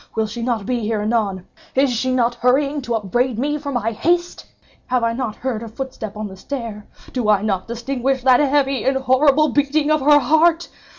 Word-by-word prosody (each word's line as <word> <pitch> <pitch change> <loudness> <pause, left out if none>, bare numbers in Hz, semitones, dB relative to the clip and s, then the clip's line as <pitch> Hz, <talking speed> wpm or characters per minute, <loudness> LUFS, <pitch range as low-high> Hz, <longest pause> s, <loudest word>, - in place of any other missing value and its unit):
Will 220 - +1
she 225 +3 -6
not 230 -4 -1
be 250 +1 -1
here 215 -1 -2
anon? 210 -5 -1 0.3
Is 270 0 +3
she 255 +3 -1
not 245 -1 +1
hurrying 275 +4 +1
to 240 -2 -2
upbraid 230 +3 -1
me 295 +4 -1
for 285 -1 -5
my 230 -3 -1
haste? 345 +9 -1 0.4
Have 250 -1 0
I 230 0 +1
not 230 -3 -3
heard 245 -4 -3
her 230 - -7
footstep 225 -3 -7
on 215 0 -4
the 190 - -10
stair? 220 -1 -6 0.3
Do 245 -5 -1
I 205 -1 +3
not 195 -3 -1
distinguish 250 +2 -2
that 255 -1 +5
heavy 275 -3 +1
and 265 0 +1
horrible 275 +3 +3
beating 290 +3 +1
of 310 -1 +2
her 295 +2 +6
heart? 320 +4 +3
250 Hz, 200 wpm, -20 LUFS, 225-280 Hz, 0.4 s, her